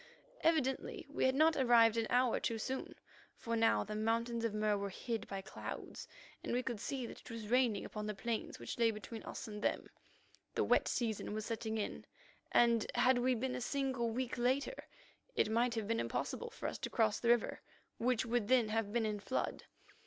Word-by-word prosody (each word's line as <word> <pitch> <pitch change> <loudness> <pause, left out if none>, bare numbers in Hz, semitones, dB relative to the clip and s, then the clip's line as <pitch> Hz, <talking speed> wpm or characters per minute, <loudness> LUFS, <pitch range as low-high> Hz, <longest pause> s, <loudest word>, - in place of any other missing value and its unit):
Evidently 310 -5 +1
we - - +1
had 260 0 +3
not 315 +3 +5
arrived 235 -3 +5
an 225 -1 0
hour 250 -1 +3
too 230 - -1
soon, 260 +4 -4 0.4
for 230 -1 -3
now 225 0 +3
the 210 - -6
Mountains 230 +2 0
of 230 - +1
Mur 210 0 +1
were 200 0 -2
hid 225 +2 -4
by 195 -1 -4
clouds, - - -7 0.4
and - - -3
we 250 +1 +1
could 240 -5 -3
see 260 +3 -3
that - - -9
it - - -13
was 225 -2 -6
raining 245 -4 +3
upon 210 0 -5
the 210 - -3
plains 230 +3 -3
which - - -6
lay 230 -1 +5
between 220 +1 -6
us - - -7
and 210 -1 -6
them. - - 0 0.7
The - - +2
wet - - +3
season 220 -3 -1
was 215 -1 -3
setting 225 -1 -2
in, 210 - -3 0.5
and, 235 -2 +4
had 255 -1 +4
we 255 +1 +2
been 255 +2 -2
a - - -3
single 260 -2 0
week 245 +1 -2
later, 265 - 0 0.5
it 215 - +2
might 235 +1 +2
have 220 -3 -2
been 230 +1 +1
impossible 475 - -2
for 465 - -9
us - - -2
to - - -3
cross 220 -3 +2
the 235 - 0
river, 240 -1 +2 0.4
which 245 0 +1
would 230 -2 0
then 245 -3 +4
have 220 -1 0
been 230 0 +1
in 210 -1 -1
flood. 260 +6 -2
230 Hz, 205 wpm, -36 LUFS, 220-250 Hz, 0.7 s, not